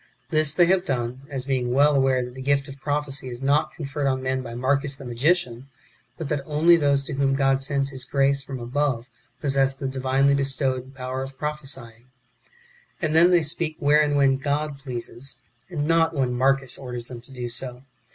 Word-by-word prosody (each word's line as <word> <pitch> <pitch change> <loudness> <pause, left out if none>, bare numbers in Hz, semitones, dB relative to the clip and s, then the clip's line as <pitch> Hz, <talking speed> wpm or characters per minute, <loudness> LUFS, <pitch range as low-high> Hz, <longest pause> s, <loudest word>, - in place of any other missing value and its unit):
This 155 -2 +2
they 175 - +6
have 180 +1 +3
done, 130 -2 -3
as 135 -3 -4
being 130 -3 0
well 145 +3 +4
aware 130 -2 +2
that 125 - -9
the 130 - -8
gift 140 0 +1
of 135 0 -10
prophecy 145 -2 -2
is 120 +2 -6
not 140 +2 +2
conferred 145 -2 -3
on 130 -1 0
men 130 0 0
by 115 -2 -7
Marcus, 135 +3 0
the 140 -1 -11
magician, 125 0 0 0.5
but 160 - -4
that 150 -2 0
only 155 +4 +4
those 140 -3 +2
to 140 - -5
whom 135 0 +1
God 135 -1 +2
sends 140 0 0
His 130 -1 -6
grace 140 +1 +1
from 135 -1 -7
above 125 0 -1 0.4
possess 135 -1 +2
the 135 0 -4
divinely 135 +1 +2
bestowed 135 -1 -1
power 130 0 -4
of 135 0 -7
prophesying; 135 -6 -5 0.9
and 155 -4 -1
then 170 +2 +7
they 175 -2 +4
speak 155 +1 -1
where 150 +1 +4
and 145 -1 +1
when 135 -1 +4
God 145 +1 -2
pleases, 130 0 -4 0.3
and 150 -5 -2
not 165 0 +3
Avhen 130 -3 +1
Marcus 135 +1 +1
orders 125 -3 -6
them 120 -2 -8
to 125 - -15
do 125 -2 -5
so. 125 +1 -6
135 Hz, 195 wpm, -24 LUFS, 130-145 Hz, 0.9 s, then